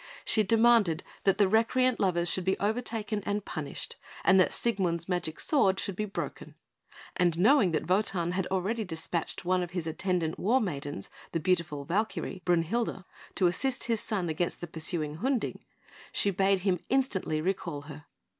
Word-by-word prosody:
She 220 - +3
demanded 225 -5 +4 0.2
that 195 -1 +4
the 205 -2 +4
recreant 230 +4 +2
lovers 175 -3 +1
should 185 +1 +2
be 190 +1 +1
overtaken 215 -1 -1
and 205 0 -2
punished, - - -6 0.3
and 190 0 +6
that 185 - +4
Siegmund's 180 -7 -1
magic 175 -4 -2
sword 195 -11 +3
should 195 - -1
be 215 - -2
broken; 200 - -6 0.6
and 175 -3 +2
knowing 215 +2 +5
that 155 - -1
Wotan 180 -2 +1
had 185 0 -1
already 195 +5 -1
despatched 170 -1 -4
one 185 0 +2
of 175 - -3
his 170 - -2
attendant 165 0 -1
war 235 +7 +3
maidens, 145 - -4 0.2
the 165 - +1
beautiful 165 -4 0
Valkyrie, 195 +1 -2
Brünhilde, 180 +3 0 0.3
to 185 - +3
assist 250 +9 +1
his 230 -2 +1
son 195 -5 -2
against 165 +2 -2
the - - -4
pursuing 160 -2 -1
Hunding, 250 +3 -1 0.5
she 200 - +2
bade 195 0 +2
him 185 -2 +1
instantly 230 -12 +1
recall 170 -4 -2
her. 150 0 -10
185 Hz, 165 wpm, -29 LUFS, 170-215 Hz, 0.6 s, and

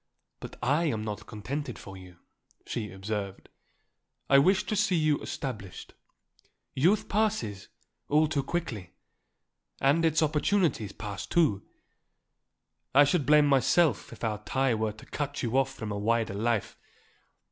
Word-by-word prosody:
"But - - -9
I 145 +7 +2
am 110 -9 -1
not 105 -1 -6
contented 125 +4 -5
for 95 - -10
you," 90 -2 -13 0.5
she 105 -3 -4
observed. 100 0 -5 0.8
"I 140 - +8
wish 190 +8 +3
to 215 - -2
see 205 -2 +2
you 155 -3 +2
established. 110 -9 -6 0.8
Youth 180 +10 +2
passes, 205 - -1 0.4
all 155 +2 +4
too 150 -2 0
quickly, 135 - -4 0.9
and 145 +5 +3
its 160 0 +3
opportunities 155 - +1
pass, 100 -3 -6
too. 130 - +2 1.3
I 145 - +9
should 145 -1 +1
blame 150 0 +6
myself 140 - +2
if - - -12
our 105 -2 -2
tie 130 +2 +1
were 110 -1 -1
to 110 - -14
cut 145 -1 -4
you 120 +1 -1
off 135 0 +2
from 110 -2 -6
a 100 - -3
wider 115 0 0
life. 110 +1 -1
135 Hz, 140 wpm, -28 LUFS, 105-155 Hz, 1.3 s, I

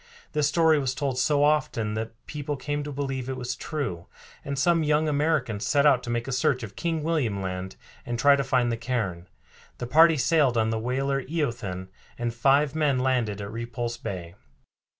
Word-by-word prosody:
This 150 -2 +1
story 160 -1 +4
was 130 -2 -1
told 135 -4 -2
so 145 +2 +3
often 135 -8 +1
that 110 +1 -4
people 145 -1 -4
came 145 +2 -3
to 145 - -6
believe 135 -2 -3
it 130 - -3
was 125 0 -3
true, 120 - -4 0.4
and 140 0 -4
some 165 +4 +3
young 155 0 +2
Americans 145 -8 0
set 140 0 +3
out 135 -4 +5
to 120 - -7
make 120 +1 -2
a - - -3
search 130 -1 +1
of 105 -2 -8
King 165 -2 -2
William 145 -11 0
Land 95 0 -4 0.3
and 120 0 -3
try 140 +3 +6
to 140 - 0
find 130 -3 +1
the 115 - -1
cairn. 110 -8 -3 0.5
The 125 - -4
party 160 +5 +6
sailed 140 -4 +3
on 110 0 +2
the 110 - -1
whaler 135 +4 -1
Eothen, 120 - -3 0.3
and 120 -1 -2
five 135 +4 +3
men 150 -4 +1
landed 125 -6 0
at 100 0 -6
Repulse 115 +1 -4
Bay. 90 -6 -6
130 Hz, 190 wpm, -26 LUFS, 115-145 Hz, 0.5 s, try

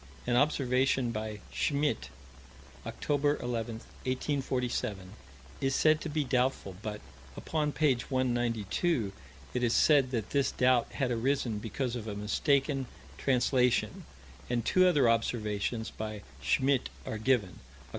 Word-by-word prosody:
An 120 - +1
observation 130 -2 +2
by 110 -1 -5
Schmidt, 145 0 0 0.8
Oct. 145 0 0
11, 115 -1 -3
1847, 125 -6 -3 0.5
is 135 0 +1
said 155 0 +4
to 160 - -4
be 150 0 0
doubtful: 125 -7 0
but, 105 -1 -5 0.4
upon 150 -2 -1
page 140 -5 +1
192, 120 - 0 0.4
it 125 - -1
is 120 -2 +2
said 140 -4 +5
that 115 -4 -3
this 140 -1 +2
doubt 125 -1 +2
had 130 -3 -1
arisen 120 -2 0
because 120 +3 -3
of 115 -2 -5
a 105 - -4
mistaken 135 +6 +1 0.3
translation, 125 -1 +1 0.4
and 120 -2 0
two 185 0 +5
other 145 -8 +4
observations 110 -1 0
by 110 -1 -6 0.2
Schmidt 135 -1 +2 0.2
are 110 - -4
given: 110 -8 +1
Oct. 65 +2 -21
125 Hz, 125 wpm, -30 LUFS, 110-140 Hz, 0.8 s, said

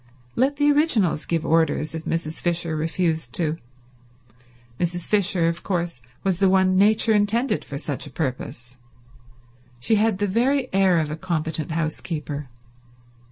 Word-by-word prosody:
Let 270 +3 +2
the 290 +1 +3
originals 240 - +2
give 165 -1 -1
orders 160 -1 +1
if 160 0 -6
Mrs. 165 -1 -3
Fisher 170 -2 0
refused 160 -3 -1
to. 160 -2 -1 1.2
Mrs. 175 0 -1
Fisher, 195 -4 +3
of 170 +1 -2
course, 170 -8 -3 0.2
was 190 -2 0
the 195 -1 +4
one 190 0 +3
Nature 215 +3 +4
intended 215 +5 +1
for 140 - -7
such 140 -1 -3
a - - -11
purpose. 125 -3 -5 1.0
She 175 - +2
had 215 -1 +2
the 205 - 0
very 250 +6 +1
air 190 -2 +4
of 155 -2 -1
a - - -2
competent 160 -3 -3
housekeeper. 155 -3 -3
170 Hz, 145 wpm, -23 LUFS, 155-205 Hz, 1.2 s, the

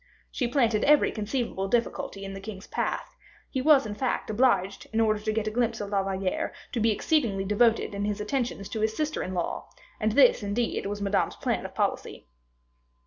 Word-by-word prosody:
She 250 - -1
planted 235 -4 +2
every 300 0 +5
conceivable 215 -3 -2
difficulty 200 -3 -1
in 195 - -6
the 195 - -6
king's 195 0 -8
path; - - -3 0.4
he 260 - -1
was, 285 -1 +5
in 210 - -4
fact, 245 0 -2
obliged, 210 -4 +1
in 220 - 0
order 215 -1 +3
to 215 +1 -2
get 215 0 -1
a 215 - -1
glimpse 230 0 0
of 205 - -4
La 200 -1 +2
Valliere, 190 -1 -2 0.2
to 240 - -2
be 225 +1 +3
exceedingly 220 -3 +1
devoted 220 +2 +2
in 200 0 -2
his 210 0 -2
attentions 210 -2 -2
to 220 - -4
his 220 0 0
sister 305 0 -1
in 185 - -4
law, 175 - -3 0.3
and 215 0 +1
this, 255 -1 +6
indeed, 205 +1 -1
was 205 0 -4
Madame's 200 0 +1
plan - - -2
of - - -18
policy. - - -2
215 Hz, 195 wpm, -27 LUFS, 200-240 Hz, 0.4 s, this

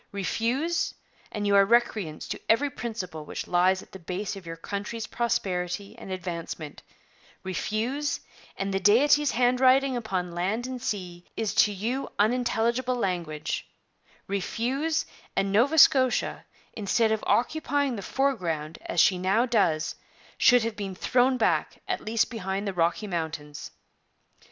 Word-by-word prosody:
Refuse, 255 - -1 0.4
and 210 -1 -3
you 200 0 +3
are 200 - +7
recreants 210 -7 +1
to - - -4
every 275 +6 +3
principle 190 -11 -5
which - - -6
lies 185 +2 +3
at - - -20
the 190 - -10
base 185 +4 -4
of 190 -3 -10
your 165 - -5
country's 205 +6 -5
prosperity 195 -3 -2
and 195 - -8
advancement; 170 -4 -5 0.6
refuse, 235 +10 -2 0.4
and 195 0 -2
the 195 - +1
Deity's 275 +9 +5
handwriting 255 +2 +3
upon 190 -7 -2
land 190 +8 -1
and 255 -1 -5
sea 180 -5 -4
is 220 -2 -1
to 210 - +4
you 230 +7 -3
unintelligible 240 +2 +1
language; 170 -8 -3 0.6
refuse, 260 - -1 0.3
and 195 0 +1
Nova 250 +10 +3
Scotia, 260 -4 +4 0.3
instead 220 +2 +1
of 220 -1 0
occupying 285 0 +1
the 205 - -5
foreground 175 - -1
as 175 - -1
she 185 +2 +5
now 195 +6 +2
does, 175 -10 +1 0.4
should 245 -2 +5
have 225 -1 -2
been 195 -3 -5
thrown 255 +6 +2
back, 225 - +1
at - - -1
least 225 +2 0
behind 200 -2 -3
the 195 - -2
Rocky 175 +4 +1
Mountains. 160 -5 -4
210 Hz, 140 wpm, -27 LUFS, 185-245 Hz, 0.6 s, are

